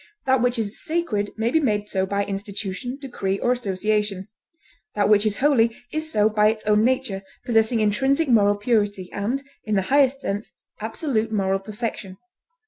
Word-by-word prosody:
That 260 -2 +3
which 245 0 +1
is 215 -2 -2
sacred 310 -12 -1
may 225 +2 0
be 320 - +4
made 210 -8 0
so 190 -2 -1
by 200 +1 0
institution, 200 +4 -4
decree, 205 -8 -3
or 245 - +1
association; 210 -3 -1 0.7
that 205 -1 +2
which 210 0 +5
is 210 - 0
holy 235 -5 +3 0.2
is 310 0 -3
so 210 0 +3
by 210 -1 +3
its 215 0 -1
own 210 0 +4
nature, 255 -5 0 0.2
possessing 225 -1 +2
intrinsic 270 +9 +2
moral 205 -4 +4
purity, 205 -3 0
and, 240 +8 -2 0.2
in 215 - -1
the 195 - +2
highest 275 -1 +4
sense, 205 -2 -4 0.3
absolute 225 +1 -2
moral 195 -2 +1
perfection. 205 -2 -5
215 Hz, 165 wpm, -23 LUFS, 205-245 Hz, 0.7 s, which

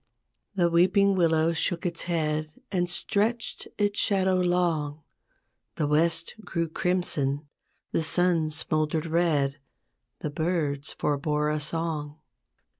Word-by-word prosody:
The 175 -3 +3
weeping 190 +4 +4
willow 165 -2 +3
shook 170 +2 -1
its 170 -1 -2
head 155 -2 -1 0.2
And 175 -2 0
stretched 215 +6 -1
its 205 0 +1
shadow 190 -2 +2
long; 170 -5 0 0.7
The 150 - 0
west 155 +3 +2
grew 170 -3 -2
crimson, 155 -5 -1 0.4
the - - +1
sun 165 -1 +2
smouldered 155 +1 0
red, 155 -4 +1 0.6
The 150 - -3
birds 150 -3 -1
forbore 150 +1 0
a 150 - -1
song. 155 -1 -2
165 Hz, 115 wpm, -27 LUFS, 150-180 Hz, 0.7 s, weeping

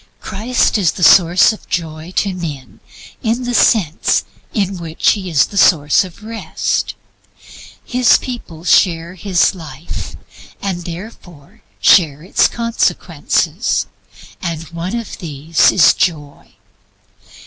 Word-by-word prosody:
Christ 220 +2 0
is 180 -6 +1
the 180 - -5
source 180 +4 +6
of 215 - -14
Joy 160 -1 -4
to 200 -2 0
men 150 -9 -7 0.4
in 235 +3 -1
the 245 0 -3
sense 190 -9 +2 0.3
in 195 -3 -2
which 165 -1 +1
He 195 -3 -3
is 155 -5 +3
the 200 - -3
source 150 -4 +4
of 185 +2 -12
Rest. 225 +1 -3 0.9
His 250 -2 +3
people 205 -11 -8
share 170 -1 +2
His 185 +1 +1
life, 160 -3 -8 0.4
and 180 -3 -4
therefore 175 -4 -11 0.2
share 150 - +4
its 185 - +2
consequences, 230 0 -1 0.6
and 165 -2 -4
one 170 +5 -5
of 230 -3 -6
these 155 0 +1
is 165 -6 +5
Joy. 155 -6 -3
175 Hz, 120 wpm, -16 LUFS, 160-205 Hz, 0.9 s, source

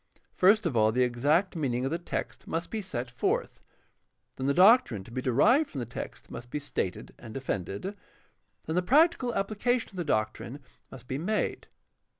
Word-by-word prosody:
First 205 +3 +4
of 160 -7 -1
all 110 -1 +4
the 125 +3 +2
exact 145 +11 +1
mean 140 -7 -1
ing 125 +2 -1
of 135 - -1
the 165 - -1
text 175 - -5
must 165 +1 -3
be 220 - -2
set 130 -10 -5
forth, 125 - -1 0.8
then 130 - -3
the 140 - +3
doctrine 190 - +5
to 120 - -14
be 130 - -3
derived 225 - +3
from - - -9
the 125 - -2
text 120 - -8
must 120 +1 -8
be 150 - -3
stated 110 -8 -4
and 110 -2 -10
defended, 125 - -4 0.7
then 160 - -3
the 180 - +3
practical 270 - +3
application 225 +5 0
of 190 - -12
the 175 - -1
doctrine 110 0 -2 0.3
must 125 -2 -12
be 130 - -3
made. 210 +7 -1
145 Hz, 185 wpm, -28 LUFS, 120-195 Hz, 0.8 s, doctrine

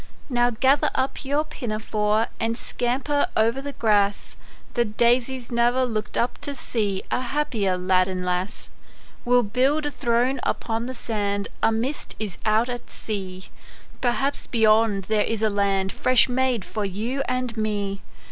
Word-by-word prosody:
Now 240 0 +3
gather 260 +5 +3
up 260 +3 -1
your 285 +2 +1
pinafore, 215 -6 -1
And 230 0 0
scamper 260 +5 0
o'er 220 +1 +4
the 285 0 -6
grass; 205 -4 +1 0.4
The 240 - +3
daisies 240 +3 +1
ne'er 240 +2 +3
looked 215 -3 -3
up 240 +1 0
to 285 -1 -3
see 205 -7 -2
A - - +2
happier 240 -8 0
lad 185 0 +3
arid 185 -1 -3
lass. 180 +3 -3 0.5
We'll 245 0 +4
build 265 +8 +1
a 295 - -1
throne 245 +1 +1
upon 230 +1 -2
the 260 - -5
sand, 205 -4 -2
A - - +4
mist 245 +6 -3
is 210 -5 -5
out 220 +2 +3
at 245 -1 -6
sea; 190 -3 -6 0.5
Perhaps 270 +3 0
beyond 220 -3 +3
there 215 +2 +1
is 225 -1 -2
a 215 - +3
land 195 -1 +1
Fresh 255 -1 +3
made 255 -4 0
for 215 - -3
you 220 +8 -2
and 255 -2 -2
me. 205 -2 -2
230 Hz, 155 wpm, -24 LUFS, 205-255 Hz, 0.5 s, o'er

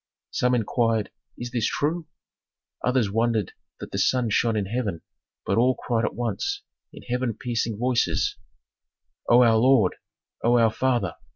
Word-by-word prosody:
Some 125 0 +1
inquired: 115 -2 0 0.3
"Is 120 0 -6
this 120 -3 0
true?" 160 +3 -1 0.8
Others 125 -5 +1
wondered 115 -2 0 0.3
that - - -8
the - - -2
sun 125 -4 +2
shone 115 +1 +2
in 100 - 0
heaven, 100 -5 -3 0.4
but - - +1
all 125 +2 +3
cried 115 -2 -1
at - - -3
once 395 - -2 0.3
in - - -12
heaven 125 -2 -2
piercing 115 -3 -2
voices, 125 +1 +1 0.9
"O 120 +1 +7
our 115 -2 +5
lord! 115 -5 +4 0.5
O 120 +1 +4
our 115 -2 +4
father! 120 -7 0
120 Hz, 150 wpm, -25 LUFS, 110-125 Hz, 0.9 s, O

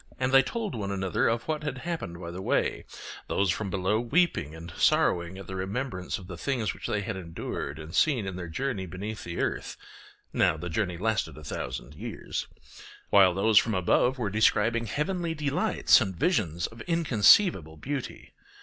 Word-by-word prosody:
And 130 0 +1
they 135 0 +8
told 220 - -4
one 100 -4 -3
another 95 -2 0
of 115 +1 0
what 155 -1 -1
had 145 -3 -3
happened 140 - -5
by 85 -1 -6
the 90 +2 -6
way, - - 0 0.4
those 100 -3 +1
from 100 +2 -3
below 95 +3 +1
weeping 120 - +1
and 85 +1 -9
sorrowing 85 +1 +2
at 95 - -8
the 95 - -6
remembrance 95 0 -3
of 95 - -11
the 90 -2 -8
things 125 -4 -1
which - - -7
they 105 - 0
had 95 - -4
endured 80 -4 -5
and 80 +1 -9
seen 130 -9 +3
in 95 -1 -4
their 90 -1 -5
journey 100 +1 -3
beneath 100 +5 -6
the 85 0 -5
earth - - -2 0.6
(now - - +3
the 90 +3 -5
journey 90 -2 -1
lasted 105 -1 -1
a 75 - -10
thousand 65 -2 -5
years), - - -5 0.6
while 95 -3 +6
those 105 +2 +5
from 110 -3 -1
above 125 +8 +2
were 110 -6 -2
describing 110 +2 +2
heavenly 170 - -2
delights 145 -2 +3
and 95 -2 -2
visions 85 - 0
of 115 0 -8
inconceivable 140 - +4
beauty. 140 - -5
100 Hz, 180 wpm, -28 LUFS, 90-130 Hz, 0.6 s, they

